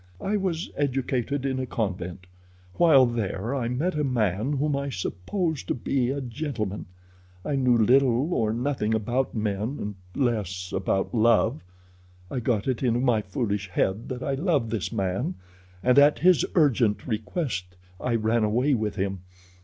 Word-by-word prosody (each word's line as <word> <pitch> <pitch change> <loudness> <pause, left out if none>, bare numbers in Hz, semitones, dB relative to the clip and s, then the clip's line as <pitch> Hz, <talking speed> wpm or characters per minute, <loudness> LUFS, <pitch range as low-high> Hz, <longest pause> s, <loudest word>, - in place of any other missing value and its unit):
I 200 - -1
was 185 -4 -2
educated 135 -1 -1
in 130 -1 -1
a 130 - -3
convent. 95 -5 -3 0.5
While 150 -7 +6
there 115 -1 -2
I 130 -4 -1
met 145 +10 -1
a 150 - -1
man 115 -1 0
whom 145 +1 0
I 140 0 -2
supposed 150 - -3
to - - 0
be 125 +1 0
a 140 +2 -1
gentleman. 120 -6 -4 0.6
I 145 - 0
knew 125 -3 +3
little 130 - +3
or 110 -7 +1
nothing 115 -2 0
about 120 +5 -1
men 105 +5 -2
and 105 0 -4 0.2
less 100 - -1
about 95 +3 0
love. 115 +3 +3 0.7
I 130 - -1
got 110 -2 0
it 130 -3 -1
into 120 -2 +2
my 120 -4 +2
foolish 100 -1 -2
head 95 +5 -1
that 130 -1 -4
I 140 - -1
loved 140 - 0
this 105 -8 -2
man, 95 -1 -1 0.5
and 125 +2 +5
at 145 +1 +6
his 180 0 +4
urgent 125 - +3
request 110 - -3 0.2
I 120 -2 0
ran 110 +1 +1
away 125 +7 +2
with 110 -4 -1
him. 95 -1 -2
120 Hz, 160 wpm, -26 LUFS, 105-140 Hz, 0.7 s, While